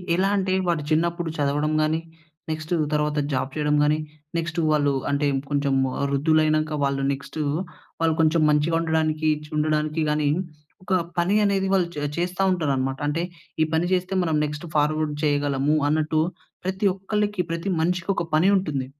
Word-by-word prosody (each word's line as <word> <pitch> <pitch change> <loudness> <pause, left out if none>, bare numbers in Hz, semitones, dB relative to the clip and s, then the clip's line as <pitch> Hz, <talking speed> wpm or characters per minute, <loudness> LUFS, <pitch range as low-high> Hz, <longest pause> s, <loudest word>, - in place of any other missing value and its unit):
ఎలా 190 +2 +2
అంటే, 190 -1 0
వాడు 165 -4 0
చిన్నప్పుడు 170 +1 +1
చదవడం 150 +2 0
గానీ, 155 +1 +1 0.5
నెక్స్ట్ 155 +2 -3 0.2
తర్వాత 150 0 0 0.2
జాబ్ 135 +1 -1
చెయ్యడం 150 -1 +1
గానీ, 150 +1 +2 0.4
నెక్స్ట్ 165 0 -2
వాళ్ళు 145 -2 +2 0.2
అంటే, 145 +1 +1 0.2
కొంచము 135 -2 +1 0.2
వృద్ధులై‌నంక 155 +1 +2
వాళ్ళు 140 0 0
నెక్స్టూ, 145 +3 -5 0.6
వాళ్ళు 165 -1 +2
కొంచం 160 0 +3
మంచిగా 150 +2 +2
ఉండడానికి 155 -1 +1 0.2
చ్ - - -15
ఉండడానికి 155 +1 0
గానీ, 150 -1 +1 0.6
ఒక 195 - -1 0.3
పని 185 +4 +2
అనేది 195 -1 +1
వాళ్ళు 180 -3 +2
చ - - -3 0.2
చేస్తా 180 +2 -1
ఉంటారనమాట. 135 -5 -1
అంటే 165 +4 -1 0.4
ఈ - - +5
పని 170 +2 +1
చేస్తే 185 +1 0
మనం 160 -2 0
నెక్స్ట్ 150 +2 -5
ఫార్వాడ్ 150 0 +1
చెయ్యగలమూ 145 0 +1
అన్నట్టూ 155 +1 +1 0.4
ప్రతి 190 +2 -1
ఒక్కలకి, 205 -1 -1
ప్రతి 170 +4 -2
మనిషికొక 180 +1 0
పని 165 +4 +4
ఉంటుంది. 145 -8 -2
155 Hz, 150 wpm, -24 LUFS, 150-170 Hz, 0.6 s, ఈ